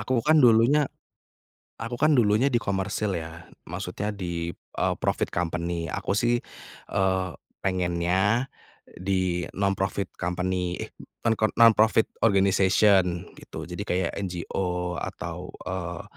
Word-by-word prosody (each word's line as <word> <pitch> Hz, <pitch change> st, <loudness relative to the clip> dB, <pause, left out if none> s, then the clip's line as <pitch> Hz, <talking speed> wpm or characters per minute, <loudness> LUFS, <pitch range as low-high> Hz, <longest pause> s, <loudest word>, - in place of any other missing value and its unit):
Aku 120 Hz, +3 st, 0 dB
kan 155 Hz, 0 st, +5 dB
dulunya 125 Hz, +4 st, +5 dB, 0.9 s
aku 115 Hz, +1 st, -4 dB
kan 155 Hz, +3 st, +4 dB
dulunya 110 Hz, +1 st, +4 dB
di 120 Hz, -, +2 dB
komersil, 100 Hz, 0 st, -1 dB
ya. 85 Hz, +1 st, -9 dB, 0.2 s
Maksudnya, 105 Hz, +1 st, -4 dB
di 85 Hz, -3 st, -3 dB
eee, -, -, -2 dB
profit -, -, 0 dB
company. 85 Hz, -1 st, -2 dB
Aku -, -, -2 dB
sih, 120 Hz, +3 st, +2 dB, 0.5 s
eee, 95 Hz, -1 st, +1 dB, 0.3 s
pengennya 95 Hz, +5 st, +1 dB, 0.5 s
di 90 Hz, -2 st, 0 dB
non-profit 100 Hz, 0 st, -1 dB
company, 90 Hz, 0 st, -1 dB
eh, -, -, -7 dB, 0.3 s
non-kon 110 Hz, -1 st, +2 dB
non-profit 110 Hz, -1 st, +6 dB, 0.2 s
organization, 95 Hz, -3 st, +3 dB
gitu. -, -, -8 dB
Jadi, 90 Hz, +3 st, -5 dB
kayak 90 Hz, -1 st, 0 dB
NGO 90 Hz, 0 st, -2 dB
atau, -, -, -6 dB, 0.2 s
eee, 90 Hz, -2 st, -4 dB
95 Hz, 115 wpm, -26 LUFS, 90-110 Hz, 0.9 s, non-profit